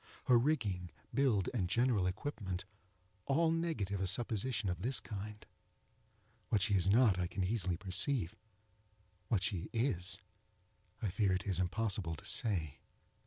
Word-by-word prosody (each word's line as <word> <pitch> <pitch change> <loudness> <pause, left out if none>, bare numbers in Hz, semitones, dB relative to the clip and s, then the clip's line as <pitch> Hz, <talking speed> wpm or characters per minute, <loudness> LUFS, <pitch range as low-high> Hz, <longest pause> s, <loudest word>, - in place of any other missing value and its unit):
Her 125 -2 +5
rigging, 105 - 0 0.2
build, 120 -10 +2
and 95 -8 0
general 115 -4 +2
equipment, 95 -3 -3 0.6
all 160 +4 +3
negative 155 - -1
a 95 - +1
supposition 115 +1 0
of 90 -1 -2
this 130 +5 +1
kind. 105 0 -7 1.0
What 110 - +3
she 100 - +1
is 95 -1 +3
not, 105 -3 +5
I 90 - 0
can 95 +2 -2
easily 95 -3 0
perceive—what 100 - -3
she 100 -1 -2
is 110 -7 0 0.9
I 100 - 0
fear 100 -1 +2
it 90 - -1
is 95 -3 +1
impossible 95 -2 -1
to - - -13
say. 85 - +1
100 Hz, 135 wpm, -35 LUFS, 90-115 Hz, 1.0 s, Her